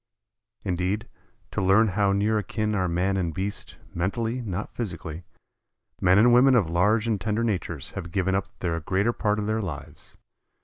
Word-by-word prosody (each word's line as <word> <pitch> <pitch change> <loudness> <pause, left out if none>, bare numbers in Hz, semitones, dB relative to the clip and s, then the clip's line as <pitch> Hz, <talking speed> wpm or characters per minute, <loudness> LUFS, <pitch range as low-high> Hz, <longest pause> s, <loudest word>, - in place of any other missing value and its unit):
Indeed, 95 +3 -1 0.4
to - - -1
learn 100 +4 +4
how 100 +1 +2
near 105 +2 +2
akin 110 0 -2
are 95 -3 +1
man 90 +3 0
and 85 -4 -2
beast, 100 +2 -4 0.2
mentally, 115 +8 -1
not 100 -3 -4
physically, 85 -6 -5 0.8
men 90 +1 +5
and 120 +3 +6
women 130 +2 +6
of 95 -9 +2
large 105 +6 +3
and 105 -4 0
tender 110 +3 0
natures 90 - -2
have 85 - -7
given 95 +1 0
up 95 0 0
the 85 -2 -1
greater 100 +8 +1
part 105 -2 0
of 105 - -2
their 110 +1 0
lives. 85 -8 -8
100 Hz, 170 wpm, -26 LUFS, 90-110 Hz, 0.8 s, and